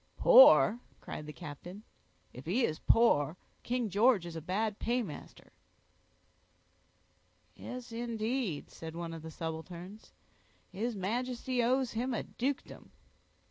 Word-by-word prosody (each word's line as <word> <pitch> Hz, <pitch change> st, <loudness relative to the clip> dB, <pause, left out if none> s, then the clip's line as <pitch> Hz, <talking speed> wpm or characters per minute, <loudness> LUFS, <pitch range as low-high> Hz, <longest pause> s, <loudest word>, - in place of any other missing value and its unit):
"Poor!" -, -, +7 dB, 0.2 s
cried 150 Hz, -, -8 dB
the -, -, -6 dB
captain. 155 Hz, +8 st, -9 dB, 0.5 s
"If 125 Hz, +5 st, -11 dB
he 230 Hz, +8 st, +2 dB
is 155 Hz, -, -3 dB
poor, 170 Hz, -9 st, +3 dB, 0.2 s
King 245 Hz, -1 st, -1 dB
George 205 Hz, -1 st, +3 dB
is 170 Hz, -1 st, -8 dB
a 160 Hz, -, -5 dB
bad 205 Hz, +5 st, -2 dB
paymaster." 235 Hz, -9 st, -4 dB, 2.0 s
"Yes, 250 Hz, -1 st, -8 dB
indeed," 230 Hz, -, -3 dB
said 160 Hz, 0 st, -9 dB
one 170 Hz, -1 st, -5 dB
of 165 Hz, -, -8 dB
the 160 Hz, -, -8 dB
subalterns, 170 Hz, +5 st, -7 dB, 0.6 s
"his 220 Hz, +5 st, -3 dB
Majesty 245 Hz, +5 st, -2 dB
owes 255 Hz, +1 st, +1 dB
him 245 Hz, +2 st, -2 dB
a -, -, -2 dB
dukedom." 270 Hz, +3 st, -4 dB
215 Hz, 120 wpm, -32 LUFS, 165-245 Hz, 2.0 s, Poor